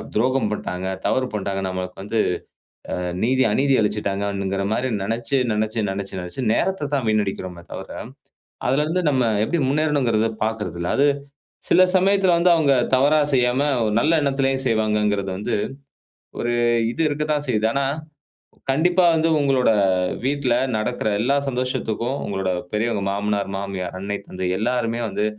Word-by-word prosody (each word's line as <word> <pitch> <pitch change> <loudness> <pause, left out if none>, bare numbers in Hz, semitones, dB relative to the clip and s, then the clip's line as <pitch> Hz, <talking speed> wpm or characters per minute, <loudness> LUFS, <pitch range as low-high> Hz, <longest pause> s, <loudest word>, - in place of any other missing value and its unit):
துரோகம் 125 0 +2
பண்ணிட்டாங்க, 95 -3 -4 0.2
தவறு 130 - +1
பண்ணிட்டாங்க, 95 -1 -2
நமக்கு 90 0 -5
வந்து 110 +3 -1 1.0
நீதி 130 +2 +3
அநீதி 135 +5 +2
இழைச்சிட்டாங்க 105 -1 -1
அப்படிங்கிற 100 0 -2
மாதிரி 130 +3 -1
நெனச்சு 115 +6 -1
நெனச்சு 110 0 -1
நெனச்சு 95 0 -4
நெனச்சு 90 +9 -5
நேரத்தத்தான் 145 -9 0
வீணடிக்கிறோமே 95 -4 -2
தவிர, - - -7 0.8
அதில 140 +4 +2
இருந்து 180 +3 0
நம்ம 130 -4 +2 0.2
எப்படி 170 +2 -1
முன்னேறணுங்கிறத 135 -7 +1 0.2
பார்க்குறதில்ல. 90 -6 -3
அது 145 +1 +5 0.6
சில 185 - +6
சமயத்துல 190 -1 +3
வந்து 175 +1 +5
அவங்க 145 -4 +3 0.2
தவறா 145 +4 +4
செய்யாம, 125 +1 +2 0.2
ஒரு 105 - 0
நல்ல 160 +6 +3
எண்ணத்திலே 135 -1 +1
செய்வாங்கங்கிறது 105 -3 +1
வந்து 105 - -2 0.8
ஒரு 120 - -1 0.4
இது 160 - -7
இருக்கத்தான் 150 0 -1
செய்யுது. 110 -2 +2
ஆனா, 140 0 +1 0.9
கண்டிப்பா 175 +6 +3
வந்து 160 0 +2
உங்களோட 135 -4 +3 0.5
வீட்ல 135 -3 +1 0.2
நடக்கிற 110 0 -1
எல்லா 135 +5 +2
சந்தோஷத்துக்கும் 125 -1 -2
உங்களோட 95 -2 -2 0.2
பெரியவங்க, 110 -1 0
மாமனார், 100 0 -1
மாமியார், 95 -2 -4
அன்னை, 100 +1 -3
தந்தை 90 0 -4
எல்லோருமே 120 0 -1
வந்து 105 - -2
115 Hz, 130 wpm, -22 LUFS, 100-140 Hz, 1.0 s, சில